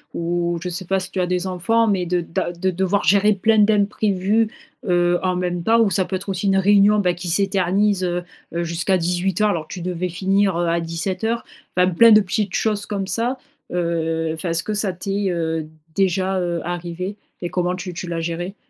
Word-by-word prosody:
Ou 170 0 -1
je - - -3
sais 180 +2 -4
pas 195 +2 +1
si 185 0 -7
tu 190 - -1
as 180 - 0
des 180 0 -1
enfants, 225 +6 +1
mais 190 -4 +1
de 180 +1 +1
d'a 165 +1 -3
de 180 +2 -1
devoir 190 +3 0
gérer 205 +2 +4
plein 220 +3 +2
d'imprévus, 210 0 +2 0.4
heu, 175 -1 +2
en 185 -1 +1
même 175 -1 -2
temps 225 +5 +4
ou 225 -3 +4
ça 190 - +2
peut 190 - -3
être 190 - -11
aussi 190 +1 -1
une 195 0 +3
réunion, 200 +2 +5
bah, 180 -3 +2
qui 175 +1 -7
s'éternise, 195 +1 +1
heu 175 0 -1 0.3
heu, 170 0 -1
jusqu'à 170 +3 0
18:00 180 +4 +1
alors 160 -4 -3
que - - -7
tu 180 - -7
devais 180 0 -2
finir, 195 +1 +1
heu, 175 0 0
à 170 0 +1
17:00. 185 +7 -2 0.3
Enfin, 180 0 +5
plein 230 +6 +6
de 215 - +8
petites 200 +1 -2
choses 210 -2 0
comme 200 -2 -2
ça. 235 +5 -1 0.3
Heu, 165 -2 -1
enfin 160 +2 -4
est-ce 165 0 0
que 215 - -3
ça 210 -2 0
t'est, 195 +2 -2
heu, 160 -2 -2 0.3
déjà, 190 0 +1
heu, 175 -1 -1
arrivé 175 +2 -4 0.3
et 175 - -2
comment 180 0 -1
tu 180 0 -6
tu 175 - -6
l'as 170 -1 -3
géré? 170 +3 -4
185 Hz, 210 wpm, -21 LUFS, 175-200 Hz, 0.4 s, de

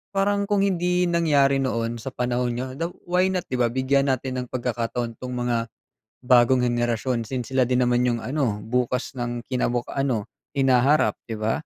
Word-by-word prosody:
parang 200 +1 +1
kung 200 -1 +3
hindi 180 -1 +1
nangyari 145 -5 +3
noon 115 -2 -2
sa 135 - -5
panahon 125 -1 -1
'nyo 130 +2 -3
daw 165 +1 -1 0.2
why 180 +1 +2
not 185 -1 -1
'di 125 - -3
ba, 120 - +4
bigyan 135 +3 +1
natin 130 0 -1
ng 125 - -7
pagkakataon 120 -1 -3
'tong 125 0 -5
mga 120 -2 -1 0.6
bagong 125 0 +5
henerasyon. 120 -1 0
Since 130 -1 -4
sila 130 -2 +3
din 125 0 +2
naman 120 0 +2
yung 120 -1 -1
ano 130 -7 -1
bukas 125 +2 -1
ng 120 0 -3
kinabuk 125 -2 -1
ano 130 -6 0 0.3
hinaharap 135 +2 +3
'di 110 - -4
ba? 110 +1 0
125 Hz, 175 wpm, -24 LUFS, 120-140 Hz, 0.6 s, bagong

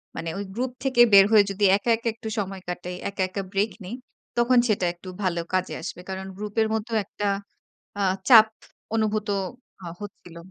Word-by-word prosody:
মানে 165 - -4
ওই 200 - -3
গ্রুপ 250 +3 -2
থেকে 260 -3 +3
বের 195 -1 +9
হয়ে 215 -2 +7
যদি 200 +1 +1
একা, 205 +4 -4
একা 230 +1 -6
একটু 225 0 -9
সময় 195 -1 -4
কাটাই, 180 0 -5
একা, 200 -1 -5
একা 195 - -3
ব্রেক 205 +2 +1
নেই। 205 +7 -5 0.4
তখন 245 +1 +4
সেটা 205 -5 +1
একটু 175 +2 -11
ভালো 175 -2 0
কাজে 185 0 0
আসবে। 195 -3 -6
কারণ 190 0 -4
গ্রুপের 210 +1 0
মধ্যেও 220 +1 -1
একটা 205 0 -4 0.7
অ্যা 205 - -1 0.3
চাপ 220 -3 +9 0.5
অনুভূত 215 -1 0 0.5
হা 175 - -6
হচ্ছিল। 180 -4 -10
205 Hz, 175 wpm, -25 LUFS, 190-220 Hz, 0.7 s, বের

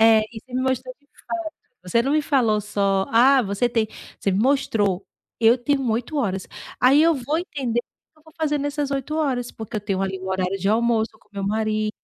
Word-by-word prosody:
é, 225 -1 +7
e 220 - -8
você 255 - -12
me 255 - 0
mostrou 255 -1 -1
de 285 - -33
fato, 335 +1 -6 0.3
você 185 +6 +1
não 275 +4 0
me 305 0 +3
falou 235 -8 +2
só: 200 -2 0
"Ah, 255 +3 +6
você 200 +4 0
tem", 225 -2 +1 0.3
você 195 - 0
me 190 - +1
mostrou. 225 -7 +1 0.3
Eu 230 +2 +6
tenho 270 0 0
8 235 +7 -2
horas. 195 -9 -1 0.3
Aí 270 +4 +6
eu 330 0 +4
vou 285 +4 -1
entender 265 - -2
o - - -23 0.3
que 310 - -27
eu - - -26
vou 315 - -17
fazer 300 -2 0
nessas 290 0 -2
8 275 +2 -2
horas, 260 -6 -1
porque 220 0 -7
eu 210 - -1
tenho 195 -2 -2
ali 190 -1 -2
um 190 - -6
horário 190 +1 -1
de 195 +2 -1
almoço 225 0 +2
com - - -30
o - - -55
meu 195 -1 -3
marido 215 0 0
235 Hz, 230 wpm, -23 LUFS, 210-275 Hz, 0.3 s, é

